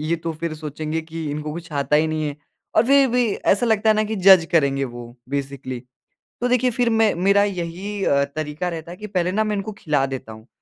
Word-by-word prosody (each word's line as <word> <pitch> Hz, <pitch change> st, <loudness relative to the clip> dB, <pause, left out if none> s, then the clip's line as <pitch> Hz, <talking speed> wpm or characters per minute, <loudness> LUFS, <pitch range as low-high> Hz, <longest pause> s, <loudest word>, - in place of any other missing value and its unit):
ये 170 Hz, -, +2 dB
तो 165 Hz, 0 st, -4 dB
फिर 170 Hz, -2 st, -2 dB
सोचेंगे 155 Hz, +1 st, -4 dB
कि 160 Hz, 0 st, -7 dB
इनको 150 Hz, +1 st, -4 dB
कुछ 165 Hz, +1 st, -8 dB
आता 145 Hz, +1 st, +1 dB
ही 155 Hz, +1 st, +3 dB
नहीं 155 Hz, -1 st, -1 dB
है 145 Hz, -, -6 dB, 0.4 s
और 220 Hz, -, +6 dB
फिर 275 Hz, +1 st, +6 dB
भी 245 Hz, +1 st, +2 dB, 0.3 s
ऐसा 205 Hz, +5 st, +1 dB
लगता 220 Hz, -1 st, +3 dB
है -, -, +5 dB
ना 215 Hz, -, +2 dB
कि 215 Hz, +1 st, -3 dB
जज़ 190 Hz, -2 st, +7 dB
करेंगे 140 Hz, -3 st, +2 dB
वो, 120 Hz, -1 st, -9 dB
बेसिकली। 135 Hz, -2 st, -4 dB, 0.6 s
तो 245 Hz, -, +2 dB
देखिए 250 Hz, 0 st, +3 dB
फिर 240 Hz, 0 st, +1 dB
मैं 225 Hz, -2 st, +3 dB
मेरा 200 Hz, +3 st, +3 dB
यही 195 Hz, +1 st, -3 dB
अ, 140 Hz, 0 st, +3 dB
तरीका 150 Hz, +4 st, -4 dB
रहता 165 Hz, 0 st, -6 dB
है 180 Hz, -, -9 dB
कि 210 Hz, -, -7 dB
पहले 180 Hz, -3 st, 0 dB
ना 215 Hz, +3 st, +1 dB
मैं 215 Hz, -1 st, -1 dB
इनको 200 Hz, +2 st, -4 dB
खिला 145 Hz, -4 st, +1 dB
देता 125 Hz, -4 st, -6 dB
हूँ 110 Hz, +1 st, -13 dB
170 Hz, 230 wpm, -22 LUFS, 150-205 Hz, 0.6 s, जज़